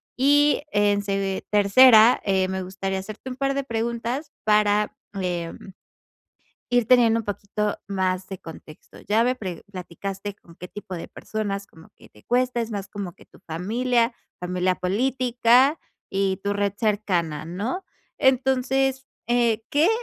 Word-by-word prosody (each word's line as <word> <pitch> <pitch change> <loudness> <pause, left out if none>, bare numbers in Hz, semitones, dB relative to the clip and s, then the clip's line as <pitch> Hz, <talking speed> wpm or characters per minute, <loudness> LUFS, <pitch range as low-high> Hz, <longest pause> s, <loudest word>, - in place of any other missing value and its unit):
Y 290 +3 +4
en 205 0 +2
se 195 -1 -2
tercera, 220 +3 +7
eh, 190 -1 +1
me 190 0 -3
gustaría 190 +1 -3
hacerte 215 +6 -8
un - - -5
par 275 0 -1
de 275 - -1
preguntas 235 +4 -3
para, 210 -1 +2 0.2
eh, 175 -2 -2 1.2
ir 245 -2 +2
teniendo 230 -2 +5
un - - -10
poquito 205 +1 -3
más 185 -1 -1
de 190 -2 -6
contexto. 160 -1 -13
Ya 220 +2 +4
ve 250 +2 +2
pre 185 -8 -6
platicaste 195 +2 -6
con 170 -4 -19
qué 180 - -9
tipo 205 -2 -8
de 170 - -6
personas 200 -2 -4
como 160 -3 -18
que - - -18
te 105 - -20
cuesta. 250 0 +1
Es 230 0 -3
más 200 -2 -5
como 195 -4 -6
que - - -18
tu - - -21
familia, 230 +8 0 0.3
familia 180 +1 0
política 245 - +2 0.3
y 195 -1 0
tu 200 - +1
red 205 -1 -1
cercana, 180 -9 -1
¿no? 210 - -3 0.4
Entonces, 265 0 +2 0.2
eh, 235 -2 +2
¿qué 305 +6 +4
210 Hz, 150 wpm, -24 LUFS, 190-245 Hz, 1.2 s, tercera